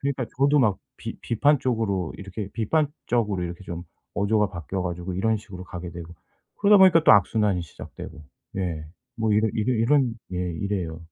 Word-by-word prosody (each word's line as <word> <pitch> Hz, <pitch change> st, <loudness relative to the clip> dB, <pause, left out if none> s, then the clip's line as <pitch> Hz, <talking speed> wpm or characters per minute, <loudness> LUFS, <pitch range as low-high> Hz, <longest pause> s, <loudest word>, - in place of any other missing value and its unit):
그러니까 135 Hz, -2 st, -1 dB
저도 140 Hz, +2 st, +4 dB
막 105 Hz, -6 st, +2 dB, 0.2 s
비 -, -, -6 dB
비판적으로 115 Hz, -, +1 dB
이렇게 100 Hz, +1 st, -6 dB
비판적으로 115 Hz, -, 0 dB
이렇게 85 Hz, +2 st, -6 dB
좀 85 Hz, -1 st, -6 dB, 0.3 s
어조가 105 Hz, 0 st, +2 dB
바뀌어 90 Hz, +2 st, -4 dB
가지고 90 Hz, +1 st, -4 dB
이런 110 Hz, +4 st, +1 dB
식으로 100 Hz, -4 st, -10 dB
가게 90 Hz, 0 st, -7 dB
되고 85 Hz, 0 st, -9 dB, 0.4 s
그러다 205 Hz, 0 st, +6 dB
보니까 170 Hz, -4 st, +6 dB
또 -, -, +8 dB
악순환이 100 Hz, -1 st, +3 dB
시작되고 80 Hz, -1 st, -10 dB, 0.3 s
예 85 Hz, -5 st, -2 dB, 0.4 s
뭐 110 Hz, -1 st, +1 dB
이러 110 Hz, +1 st, +3 dB
이런 120 Hz, +3 st, +2 dB, 0.2 s
예 90 Hz, -, -2 dB, 0.2 s
이래요. 90 Hz, -5 st, -2 dB
105 Hz, 365 characters per minute, -25 LUFS, 90-120 Hz, 0.4 s, 또